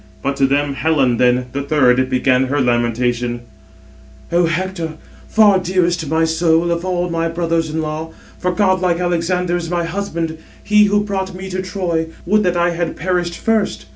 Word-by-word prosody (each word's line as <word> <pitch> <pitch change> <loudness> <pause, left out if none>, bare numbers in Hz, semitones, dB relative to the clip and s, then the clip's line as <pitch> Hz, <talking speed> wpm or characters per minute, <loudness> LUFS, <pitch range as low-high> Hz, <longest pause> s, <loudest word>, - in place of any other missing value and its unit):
But 140 - -1
to 135 -1 +3
them 140 +1 0
Helen 135 -5 +1
then, 125 +1 +2
the 140 +2 -3
third, 130 -3 +2
began 130 0 +2
her 140 +3 -1
lamentation: 120 -1 0 0.9
"O 170 0 +3
Hector, 170 -1 -3 0.3
far 210 -3 +5
dearest 180 -1 0
to 160 - -5
my 160 +2 +2
soul 165 +1 +2
of 170 0 -1
all 180 -1 -1
my 165 0 0
brothers 165 -1 -1
in 160 +1 -2
law, 155 +1 -4 0.3
for 180 - 0
godlike 185 -2 +1
Alexander 175 0 0
is 170 -2 -5
my 175 -1 -1
husband, 165 -3 -3 0.2
he 210 0 +5
who 205 0 +2
brought 190 -2 -3
me 190 +1 -7
to 185 +1 -2
Troy:—would 180 +1 -1
that 180 -3 +1
I 175 0 +2
had 170 -1 -3
perished 175 0 -2
first. 220 -3 0
170 Hz, 170 wpm, -18 LUFS, 145-180 Hz, 0.9 s, far